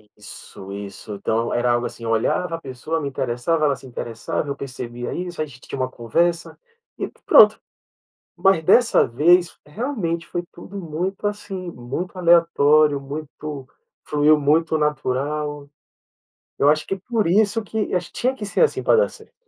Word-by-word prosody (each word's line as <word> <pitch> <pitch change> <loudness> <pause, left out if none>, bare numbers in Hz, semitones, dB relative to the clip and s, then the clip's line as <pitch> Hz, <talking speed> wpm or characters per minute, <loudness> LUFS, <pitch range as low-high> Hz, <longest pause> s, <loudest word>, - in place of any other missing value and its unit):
Isso, 100 -2 -10
isso, 100 +1 -7
então 115 +3 -1
era 120 0 +1
algo, 120 0 +1
assim, 115 - -11
eu 115 - -1
olhava, 165 +10 0
a 165 - -8
pessoa 140 +5 -4
me 145 - -3
interessava, 135 +5 0
ela 140 -2 +2
se 130 - -13
interessava, 115 +2 -4
eu 140 - -3
percebia 120 -2 -6
isso, 175 -2 -4
a - - 0
gente 130 -4 -14
tinha - - -7
uma 130 0 0
conversa 165 +9 -1 0.4
e - - -2 0.2
pronto, - - +7 0.8
mas 190 -4 +3
dessa 230 +8 +5
vez 170 +8 +3
realmente 170 - -3
foi 175 - -3
tudo 190 +3 -11
muito, 180 +4 -3
assim, 195 -3 -4
muito 165 +8 -6
aleatório 155 -4 +4
muito 145 0 -7 0.4
fluiu 150 +1 +4
muito 160 +3 +2
natural. 145 0 -2 0.9
Eu 145 - +4
acho 155 0 +2
que 195 - -1
por 215 +1 -1
isso 210 +4 +3
que, 215 0 -2 0.3
tinha 255 +2 0
que 220 -6 -7
ser 205 - 0
assim 465 - +3
pra - - +4
dar 480 +2 +3
certo. 445 -1 -15
155 Hz, 160 wpm, -22 LUFS, 130-180 Hz, 0.9 s, pronto